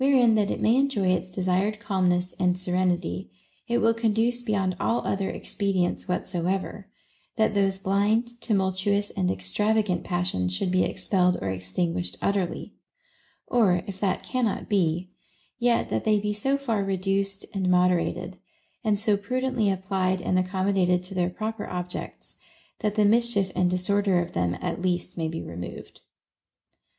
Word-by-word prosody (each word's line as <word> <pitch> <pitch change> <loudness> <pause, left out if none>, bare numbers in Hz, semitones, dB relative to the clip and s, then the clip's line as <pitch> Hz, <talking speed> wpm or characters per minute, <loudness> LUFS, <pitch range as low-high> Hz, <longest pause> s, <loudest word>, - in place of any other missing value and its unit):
Wherein 260 -4 +5
that 210 -2 +2
it - - -2
may 230 +3 +4
enjoy 265 -9 +2
its 185 0 0
desired 185 +3 0
calmness 185 -4 0
and 180 0 +2
serenity, 180 - -1 0.4
it 235 - +1
will 225 0 +3
conduce 230 +2 +1
beyond 195 -5 0
all 235 - 0
other 195 0 -1
expedients 195 -4 -1
whatsoever, 185 +2 -2 0.5
that 220 -1 +2
those 195 -1 +2
blind, 215 +5 0
tumultuous, 200 0 0
and 90 - 0
extravagant 180 - 0
passions 175 - -1
should 180 - -1
be 185 0 +3
ex - - -4
pelled 180 -2 +3
or 95 0 -2
extinguished 165 - -2
utterly; 195 -3 -1 0.7
or, 190 -8 +3
if 195 -1 -7
that 195 -2 0
cannot 245 -5 -1
be, 180 -2 0 0.5
yet 240 -1 +2
that - - 0
they 215 -1 +3
be 210 0 -1
so 270 +7 0
far 230 -7 -1
reduced 195 +1 -1
and 190 -2 0
moderated, 180 -1 +1 0.5
and 210 -3 +1
so 210 0 +2
pru 205 +6 -2
dently 235 -6 +1
applied 190 -1 0
and 185 +1 +1
accommodated 185 -1 +1
to 185 +2 -8
their 180 -1 +1
proper 215 +4 -4
objects, 180 0 -6 0.4
that 210 -2 -1
the 210 -1 +4
mischief 210 -3 +3
and 180 -1 +3
disorder 190 +1 +2
of 175 - -3
them 90 0 -1
(at - - -3
least) 180 -1 -1
may 165 -2 -1
be 165 +1 -4
removed. 85 +1 -8
190 Hz, 155 wpm, -26 LUFS, 180-210 Hz, 0.7 s, Wherein